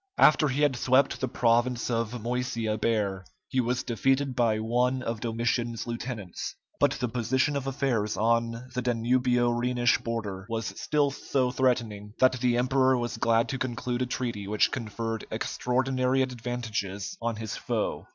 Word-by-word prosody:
After 155 0 +6
he 140 +2 0
had 145 -3 +3
swept 130 +3 +2
the 130 - +1
province 120 0 +1
of 115 +1 -1
Moesia 120 -2 -1
bare, 105 -4 0 0.2
he 130 - -1
was 125 +1 -1
defeated 135 +2 +1
by 115 -3 +2
one 125 +4 +1
of 115 -2 -3
Domitian's 115 0 -1
lieutenants, 115 -5 -5 0.2
but - - +4
the 125 - -2
position 130 +4 0
of 135 -1 -2
affairs 125 -6 0
on 115 +2 +1
the 125 - -1
Danubio 120 0 +2
Rhenish 120 0 +2
border 105 -5 -4
was 115 -1 -3
still 145 -2 +2
so 130 -2 0
threatening, 115 -5 0
that 130 -1 +4
the 120 -1 +2
emperor 130 +1 +3
was 120 -1 -3
glad 115 0 +2
to 135 - -3
conclude 125 0 -2
a 125 - 0
treaty 115 -5 -3
which 105 +1 +2
conferred 115 -2 -4
extraordinary 130 +1 0
advantages 115 -6 -4
on 115 -1 -1
his 110 -1 -5
foe. - - -2
120 Hz, 155 wpm, -28 LUFS, 115-130 Hz, 0.2 s, After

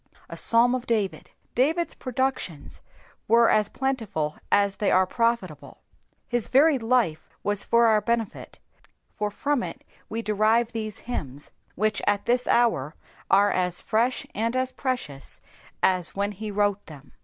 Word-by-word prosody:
A - - -7
Psalm 235 +2 +4
of 255 -1 -3
David. 200 -8 -1 0.2
David's 320 +7 +1
productions 255 - -3 0.5
were 230 +1 +5
as 210 -1 +2
j^iHful 225 - -2
as 200 -1 +3
they 210 - +1
are 185 0 +4
profUable. 230 -6 -2 0.5
His 240 -3 -1
varied 275 0 +4
life 225 -9 0
was 205 -1 -1
for 235 0 +3
our 215 -2 +4
ben^, 230 0 -2 0.6
for 210 0 -2
from 285 +5 -1
U - - -4 0.4
we 230 +1 -4
derive 220 +2 +2
these 215 -2 -5
hymns, 145 - -5 0.2
which 215 +1 0
at 205 -1 +1
this 245 +1 +1
hour 165 - +2 0.3
are 200 +1 +5
as 180 -1 -1
fresh 235 +3 0
and 230 +3 -1
as 255 0 0
precious 245 - -4 0.4
as 185 -3 +2
when 200 +1 -1
he 210 +2 -6
wrote 205 -1 0
them. 145 -3 -13
215 Hz, 145 wpm, -25 LUFS, 195-240 Hz, 0.6 s, were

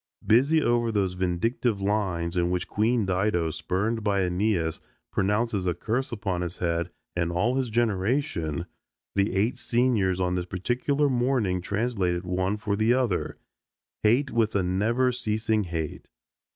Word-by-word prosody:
Busy 135 +9 +4
over 120 -1 +2
those 100 -4 0
vindictive 95 +5 0
lines 95 -4 -1
in 85 -1 +1
which 90 0 -1
Queen 110 +1 +1
Dido, 90 -3 +1
spurned 105 +8 -1
by 100 -2 +2
Aeneas, 90 -3 0 0.3
pronounces 105 -1 0
a 90 - +1
curse 125 +8 -2
upon 100 -6 -2
his 90 0 -4
head 85 -1 -1 0.3
and 85 -1 0
all 105 +9 +1
his 130 -2 0
generation, 110 - 0 0.5
the 100 -1 +1
eight 105 +6 +1
seniors 115 -7 +1
on 90 -1 +1
this 90 -1 -1
particular 125 +10 0
morning 120 -8 +1
translated 100 -3 -1
one 95 +3 -1
for 105 -2 -1
the 110 +4 +3
other, 120 -9 -1 0.6
"Hate, 125 +6 +3
with 110 -2 +1
a 100 - +2
never 110 +8 +1
ceasing 110 -2 0
hate." 80 -3 -5
100 Hz, 145 wpm, -26 LUFS, 90-120 Hz, 0.6 s, Busy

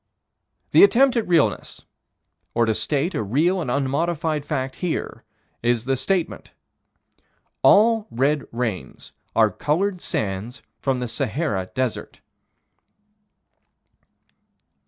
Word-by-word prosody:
The - - +7
attempt 270 -8 +5
at 230 - 0
realness, 170 -4 0 0.7
or 120 0 +3
to 110 - +1
state 150 - -1
a - - -1
real 155 - +1
and 150 - -4
unmodified 150 +3 -1
fact 135 -3 -3
here, 180 -3 -3 0.4
is 120 -1 0
the 135 0 +1
statement: 175 +7 -2 1.1
All 220 +1 +5
red 140 +4 0
rains 115 - -4 0.2
are 110 -2 +4
colored 180 - -1
by - - -18
sands 105 - -4 0.2
from 135 -2 0
the 125 0 -3
Sahara 115 - -2
Desert. 130 -3 -3
140 Hz, 110 wpm, -23 LUFS, 120-175 Hz, 1.1 s, The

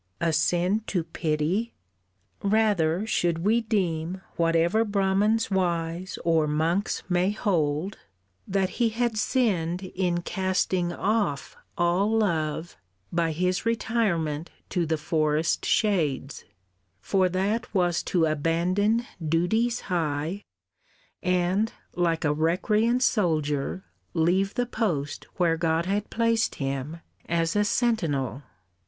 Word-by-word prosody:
A 165 -1 +1
sin 175 +6 +2
to 180 -4 0
pity! 165 +8 -1 0.7
Rather 200 -4 +2
should 170 -6 0
we 225 +3 +3
deem 185 -5 -1
Whatever 170 +6 +2
Brahmans 205 +1 +1
wise, 175 -1 -1
or 165 -2 +3
monks 165 +7 0
may 180 +1 +2
hold, 180 -4 -1 0.5
That 190 -1 0
he 235 - +4
had 235 0 -1
sinned 195 -7 0
in 175 -2 0
casting 185 -2 0
off 200 -6 -1 0.2
all 185 +6 +2
love 165 - -1 0.4
By 165 -1 +1
his 180 +4 0
retirement 185 -9 0 0.2
to 175 -3 0
the 160 0 0
forest 155 0 0
shades; 155 - 0 0.5
For 185 - +1
that 195 +5 -1
was 175 -4 +1
to 170 -3 +2
abandon 175 +9 +1 0.2
duties 200 +10 +1
high, 165 +1 -2 0.8
And, 180 +4 +1 0.2
like 170 -2 +1
a 145 - +3
recreant 210 - +2
soldier, 160 - 0 0.3
leave 185 +4 +2
the 245 - +1
post 170 - -2
Where 170 -2 +2
God 165 0 +1
had 205 +2 -1
placed 230 -1 +1
him 140 +4 -4 0.3
as 165 +1 +1
a 205 - +3
sentinel. 165 - 0
180 Hz, 110 wpm, -26 LUFS, 160-205 Hz, 0.8 s, he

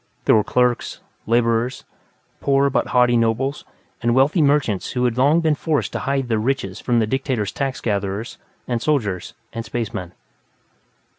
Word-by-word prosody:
There - - +5
were 110 - +4
clerks; 125 +1 0 0.3
laborers; 115 +2 +1 0.6
poor 140 0 +2
but - - +1
haughty 125 -1 +3
nobles: 120 +5 0 0.4
and 120 0 +2
wealthy 140 +6 +3
merchants 140 -9 +1
who 125 -1 +1
had 120 -2 +1
long 145 +6 +4
been 160 -2 +2
forced 150 0 -1
to - - -2
hide 135 -2 -1
their 110 -2 +1
riches 110 -5 -2
from 120 -2 0
the 115 - +3
dictator's 130 -3 -1
tax 135 -2 -3
gatherers, 100 +1 -3 0.3
and 120 -2 -1
soldiers, 110 - -1 0.2
and 115 -1 -4
spacemen. 110 -6 -4
120 Hz, 155 wpm, -21 LUFS, 115-135 Hz, 0.6 s, There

